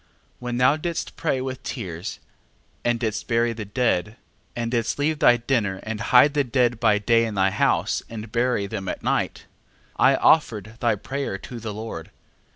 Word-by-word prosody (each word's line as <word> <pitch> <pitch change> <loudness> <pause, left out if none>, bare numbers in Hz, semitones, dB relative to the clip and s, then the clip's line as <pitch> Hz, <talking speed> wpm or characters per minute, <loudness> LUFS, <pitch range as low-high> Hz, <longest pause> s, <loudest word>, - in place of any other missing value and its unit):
12:12. - - -36 0.3
When 125 -1 -3
thou 130 +4 +4
didst 170 +1 -4
pray 140 -5 -1
with 130 0 -5
tears, 90 -6 -5 0.6
and 120 -1 +1
didst 110 -3 -2
bury 115 -1 +2
the 110 -2 -6
dead, 105 -1 0 0.4
and 115 -1 -2
didst 115 -2 0
leave 150 +1 0
thy 120 - +6
dinner, 115 -6 0
and 110 0 -4
hide 125 +5 +5
the 145 -1 +2
dead 125 -2 +1
by 110 -3 +4
day 115 +2 +3
in 110 -2 -3
thy 95 0 +2
house, - - +1
and 110 -1 -7
bury 120 -3 +1
them 100 -1 -5
by - - -2
night, - - -1 0.5
I - - +5
offered 110 - +2
thy 115 -2 +2
prayer 135 0 -4
to 120 +4 -9
the 110 -1 -5
Lord. 105 -6 -7
115 Hz, 180 wpm, -24 LUFS, 105-125 Hz, 0.6 s, thy